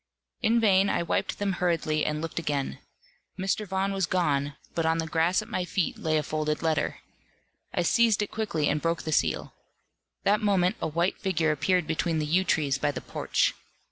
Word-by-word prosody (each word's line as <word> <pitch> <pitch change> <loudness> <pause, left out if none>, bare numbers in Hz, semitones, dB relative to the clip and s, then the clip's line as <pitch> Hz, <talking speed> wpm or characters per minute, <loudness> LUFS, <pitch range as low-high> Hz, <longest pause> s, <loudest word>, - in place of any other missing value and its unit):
In 230 +2 +3
vain 195 -3 +4
I - - +1
wiped - - -1
them 205 -1 0
hurriedly 165 -4 0
and 150 +1 -2
looked 165 +1 -3
again. 145 -4 -2 0.6
Mr. 195 +2 -1
Vaughan 190 +1 -1
was 190 -3 0
gone; 145 -6 0 0.2
but 165 - 0
on 160 0 +2
the 165 - -1
grass 165 +5 +1
at - - -14
my 185 - -2
feet 180 0 -1
lay 155 -1 +1
a 150 - 0
folded 155 +1 -2
letter. 155 -2 0 0.7
I 175 - 0
seized 225 +2 +3
it 205 - -6
quickly, 195 -9 -1
and 150 +1 +1
broke 165 0 -1
the 155 - -3
seal. - - 0 0.7
That 210 +2 +3
moment 200 0 +2
a - - 0
white 170 +4 0
figure 165 -5 +1
appeared 175 +4 +1
between 160 +1 0
the 155 - 0
yew 175 +5 +2
trees 145 -7 +1
by 145 - +1
the 145 - -3
porch. - - 0
170 Hz, 195 wpm, -27 LUFS, 155-190 Hz, 0.7 s, vain